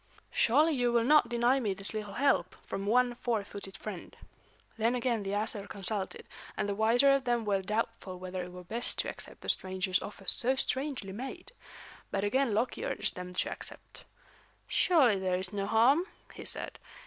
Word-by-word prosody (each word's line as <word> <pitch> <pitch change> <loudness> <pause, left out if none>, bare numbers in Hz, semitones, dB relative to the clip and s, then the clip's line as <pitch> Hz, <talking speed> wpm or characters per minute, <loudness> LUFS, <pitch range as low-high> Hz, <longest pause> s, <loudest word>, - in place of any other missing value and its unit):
Surely, 300 +8 +4
you 245 -3 +1
will 235 -1 +3
not 300 +5 +5
deny 240 +3 +3
me 205 -6 -1
this 195 +3 +1
little 210 -2 -5
help, 270 -10 +2
from 195 +1 -4
one 245 +2 +3
four 235 -3 -1
footed 195 -1 -8
friend." 205 -5 -8 0.6
Then 230 +2 +1
again 240 -2 0
the 195 - -4
Æsir 210 0 +2
consulted, 195 0 -3 0.3
and - - 0
the 200 - -1
wiser 230 +6 +4
of 275 -1 +2
them 240 -2 +1
were 200 -2 +1
doubtful 195 -2 -3
whether 185 0 -5
it 180 0 -7
were 180 0 -10
best 230 +7 -1
to - - -1
accept - - -4
the - - -6
stranger's 185 0 +1
offer 200 -1 -9
so 250 +7 +2
strangely 265 -6 -2
made. 255 +6 -7 0.6
But 195 - -1
again 260 +4 +2
Loki 225 +5 -1
urged - - -1
them 180 0 -6
to - - +1
accept. - - -7 0.6
"Surely, 265 - +4
there 185 -1 0
is 185 +2 -2
no 200 -1 -2
harm," 250 - +4 0.3
he - - -9
said. - - -2
220 Hz, 185 wpm, -31 LUFS, 195-245 Hz, 0.6 s, not